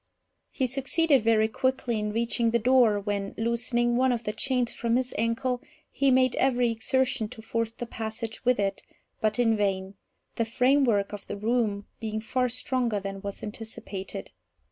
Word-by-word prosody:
He 265 - -1
succeeded 275 +2 +2
very 220 0 +3
quickly 240 0 -1
in 210 0 -2
reaching 230 +1 +1
the 235 - +3
door, 235 -3 +4
when, 200 -1 -3
loosening 235 +1 +1
one 260 0 +3
of 240 -1 -1
the 210 - -1
chains 250 +1 0
from 235 0 0
his 255 0 0
ankle, 245 +3 0 0.3
he 275 0 +2
made 255 -1 +4
every 245 -3 +2
exertion 245 +1 +1
to 220 - -10
force 230 0 -1
the 235 +1 -7
passage 220 -1 -5
with 250 -3 +3
it, 195 -1 -1 0.4
but 215 +1 +1
in 230 -2 +3
vain, 195 -2 -1 0.4
the 230 - +1
framework 240 -4 +2
of 205 -1 -8
the - - -5
room 215 -2 0
being 220 -1 -3
far 250 +3 0
stronger 245 -3 0
than 195 0 -6
was 200 -1 -6
anticipated. 205 -3 -6
230 Hz, 165 wpm, -27 LUFS, 215-250 Hz, 0.4 s, door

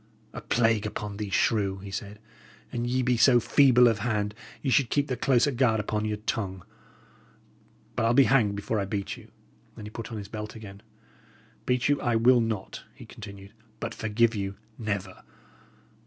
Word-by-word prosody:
"A - - -6
plague 115 -3 +1
upon 105 -1 -5
thee, 105 -1 -4
shrew!" 100 -1 +1
he 100 +1 -9
said. 100 +2 -6 0.5
"An 120 -1 -2
ye 130 +1 0
be 125 -1 +2
so 120 +2 +6
feeble 125 0 +5
of 115 -2 +1
hand, 105 -2 -1 0.3
ye 135 - 0
should 135 -3 +3
keep 145 -1 +1
the 130 -3 -2
closer 130 +3 +2
guard 120 -3 +2
upon 105 0 -2
your 105 -1 -2
tongue. 95 -4 -3 1.3
But 115 - +1
I'll 120 - +2
be 140 - +7
hanged 115 -7 +3
before 105 +2 -2
I 100 - -1
beat 100 0 -3
you!" 115 -3 -15 0.5
and 110 - -8
he 105 - -8
put 115 +2 -7
on 110 - -5
his 100 -1 -7
belt 105 +1 -7
again. 100 -2 -10 0.9
"Beat 125 0 +2
you 145 0 +1
I 120 -1 +1
will 120 +2 +5
not," 110 -4 -3
he - - -12
continued; 100 -2 -11 0.3
"but 115 0 -4
forgive 115 +2 +1
you? 100 -2 -3 0.2
never. 100 -4 -4
110 Hz, 185 wpm, -27 LUFS, 105-120 Hz, 1.3 s, be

